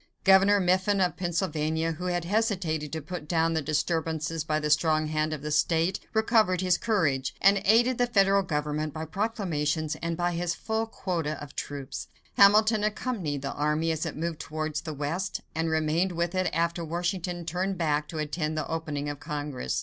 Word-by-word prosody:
Governor 195 +1 +6
Mifflin 185 +2 +2
of 180 -1 +1
Pennsylvania, 165 -2 -1
who 165 +3 -6
had 175 -1 -1
hesitated 180 - 0
to 160 -2 -4
put 160 -1 -6
down 165 0 +2
the 160 - 0
disturbances 160 +1 -1
by 155 0 0
the 150 -1 -1
strong 155 0 +3
hand 155 0 -1
of 150 -2 -5
the 150 - -3
state, 165 +3 +2 0.2
recovered 220 -4 +3
his 180 -2 +2
courage, 155 - 0
and 195 0 +5
aided 235 +4 +4
the 245 - +3
federal 200 -3 +4
government 150 -3 -2
by 160 0 -4
proclamations 160 -6 -1
and 165 0 -2
by 175 0 +1
his 175 0 -1
full 220 0 -2
quota 165 -8 -3
of 145 -1 -10
troops. 140 -1 -5 0.3
Hamilton 215 +2 +6
accompanied 210 - -2
the 140 - -3
army 150 +2 0
as 160 -1 -2
it 160 -3 -4
moved 165 0 -3
towards 155 -1 -3
the 155 - -5
West, 165 +7 -3
and 165 0 -1
remained 160 +3 +1
with 170 +1 -1
it 185 -1 +1
after 170 +1 0
Washington 175 +1 -3
turned 185 +3 -2
back 150 -2 0
to 160 - -7
attend 155 +1 -2
the 155 - -2
opening 155 -3 -3
of 145 -1 -4
Congress. 145 - -3
165 Hz, 180 wpm, -27 LUFS, 155-185 Hz, 0.3 s, Governor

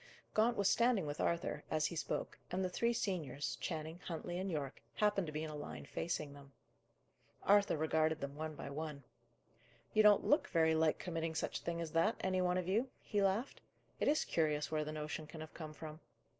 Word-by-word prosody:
Gaunt 230 +2 +3
was 200 -1 +3
standing 230 -3 +4
with 145 0 -3
Arthur, 170 +1 0
as 155 -1 +1
he 170 - -1
spoke, 155 - -3
and 185 +1 0
the 180 - -2
three 235 +5 +2
seniors, 145 - -2
Channing, 160 +5 -4
Huntley, 175 +1 -3
and 190 +1 -2
Yorke, 145 -5 -3
happened 205 -4 +2
to - - -4
be 155 +1 -3
in 160 - -4
a - - -6
line 150 - -6
facing 150 -4 -3
them. 140 -1 -14 0.9
Arthur 200 -4 +5
regarded 160 0 +2
them 140 -1 -4
one 155 0 -4
by 140 - -6
one. 150 -1 -5 0.9
"You 215 - +6
don't 210 -1 +6
look 295 - +4
very 160 -2 +3
like 160 -1 +3
committing 165 -2 -3
such - - -1
a - - -17
thing 170 0 -2
as 165 -2 -3
that, 165 +8 +3
any 185 -1 +1
one 180 0 +2
of 180 -1 -1
you," 225 +8 +2
he 205 -2 0
laughed. 200 +7 +1 0.4
"It - - +1
is 300 +2 +3
curious 150 -2 +1
where 155 -1 +1
the 155 - -4
notion 150 0 -4
can 160 - -9
have 155 - -8
come 155 -2 -6
from." 155 0 -8
160 Hz, 210 wpm, -37 LUFS, 155-190 Hz, 0.9 s, You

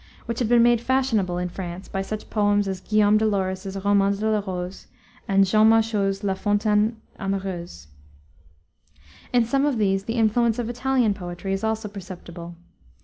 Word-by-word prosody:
which 230 0 -4
had 240 -3 0
been 240 -1 +5
made 240 -1 +4
fashionable 235 -9 +1
in 180 0 -1
France 180 +1 -7
by 195 - -3
such 215 +2 -6
poems 205 -1 +2
as 190 -1 -4
Guillaume 215 +1 +3
de 220 - +1
Lorris's 190 -1 -2
Roman 200 -1 +3
de 215 +2 -1
la 215 - +2
Rose, 185 -2 -6 0.4
and 195 0 +4
Jean 215 +3 +4
Machault's 215 -3 +1
La 195 -1 +1
Fontaine 210 +3 +1 0.2
Amoureuse. 190 - -4 1.5
In 245 -2 +3
some 270 +4 +1
of 290 -4 +1
these 195 -2 +1
the 225 - -3
influence 225 0 +2
of 240 -1 -2
Italian 245 -3 +1
poetry 180 0 -5
is 195 - -3
also 220 0 -1
perceptible. 175 -3 -9
205 Hz, 165 wpm, -24 LUFS, 190-225 Hz, 1.5 s, been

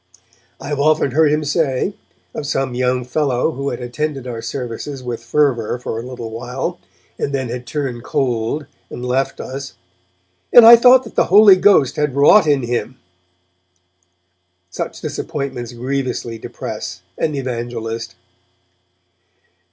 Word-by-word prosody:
I 135 - -8
have 145 -2 -2
often 155 -1 +2
heard 155 +2 +3
him 150 +1 +1
say, 150 +3 0 0.4
of 145 - -5
some 135 -4 -1
young 125 0 0
fellow 135 +1 0
who 140 -1 -3
had 120 - -5
attended 135 +2 -4
our 120 -2 -5
services 125 +3 -6
with 120 -2 -5
fervour 125 -4 +1
for 115 -2 -5
a - - -6
little 125 -3 -7
while, 125 +9 -4 0.4
and 140 - -1
then 130 -3 -3
had 120 0 -6
turned 130 -4 -4
cold 125 +3 -1 0.2
and 125 - -7
left 130 +2 -1
us, 135 +1 -7 0.8
'and 240 - +9
I 235 +1 +11
thought 250 +2 +6
that 225 - -11
the - - +2
Holy 205 0 +7
Ghost 185 -9 +3
had 150 -3 0
wrought 150 +7 +6
in 140 -3 +2
him!' 120 +1 -3 1.7
Such - - -5
disappointments 135 -7 -5
grievously 125 -2 -3
depress 90 -4 -7 0.2
an 155 - 0
evangelist. 115 -3 -4
130 Hz, 140 wpm, -18 LUFS, 120-150 Hz, 1.7 s, I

